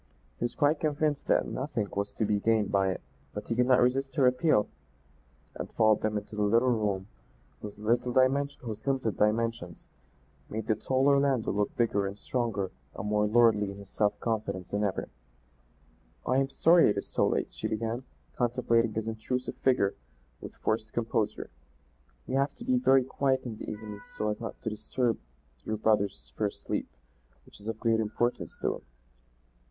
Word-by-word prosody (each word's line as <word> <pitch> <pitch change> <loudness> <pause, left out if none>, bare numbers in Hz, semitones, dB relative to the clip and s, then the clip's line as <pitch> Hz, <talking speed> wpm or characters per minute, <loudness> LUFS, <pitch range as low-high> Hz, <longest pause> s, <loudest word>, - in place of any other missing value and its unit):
He - - 0
was 120 - -3
quite 145 +1 +3
convinced 150 -1 0
that - - +3
nothing 130 -6 -2
was 100 0 -2
to 110 - 0
be 105 -1 +1
gained 110 -1 +2
by 95 -1 +3
it, 95 - -3 0.3
but 105 0 -5
he 115 - -1
could 125 +1 +3
not 130 -1 +5
resist 135 +1 0
her 135 - +4
appeal, 125 -3 +3 0.9
and - - -6
followed 110 -1 +4
them 105 0 0
into 105 +1 -7
the 105 - -1
little 115 +5 +4
room 105 -4 0 0.6
whose 105 -1 -8
limited 120 +3 0
dimensions 115 -6 0 0.6
made 110 0 -4
the 110 - +2
tall 130 +5 0
Orlando 140 -4 +3
look 105 0 -1
bigger 100 -4 +1
and 100 +1 -6
stronger 110 -5 -2 0.2
and 95 - -4
more 105 0 +2
lordly 110 -2 +4
in 100 - -8
his 100 -1 -12
self 105 -1 +1
confidence 100 -5 -2
than 105 +1 -1
ever. 100 -2 -1 1.2
"I 130 - +2
am 135 0 +2
sorry 165 +3 +5
it 105 - 0
is 100 - -2
so - - +1
late," - - -1
she - - -3
began, 115 +3 -2 0.3
contemplating 115 -2 +2
his 110 0 -2
intrusive 115 +3 -3
figure 125 -7 +2 0.5
with - - -9
forced 110 0 -2
composure. 115 - -1 0.7
"We - - -5
have 135 +1 +1
to - - -10
be 125 - +3
very 130 +1 +5
quiet 135 +1 0
in 115 -4 -6
the - - -6
evenings 110 - -8
so 105 - 0
as 105 - -2
not 115 - -6
to - - -1
disturb 115 +2 -1 0.4
your 110 - -2
brother's 100 - 0
first - - -2
sleep - - -2 0.6
which - - -16
is 105 - -10
of 115 -1 -3
great 115 -2 +2
importance 110 +3 -1
to - - +1
him." - - -18
110 Hz, 175 wpm, -29 LUFS, 105-125 Hz, 1.2 s, not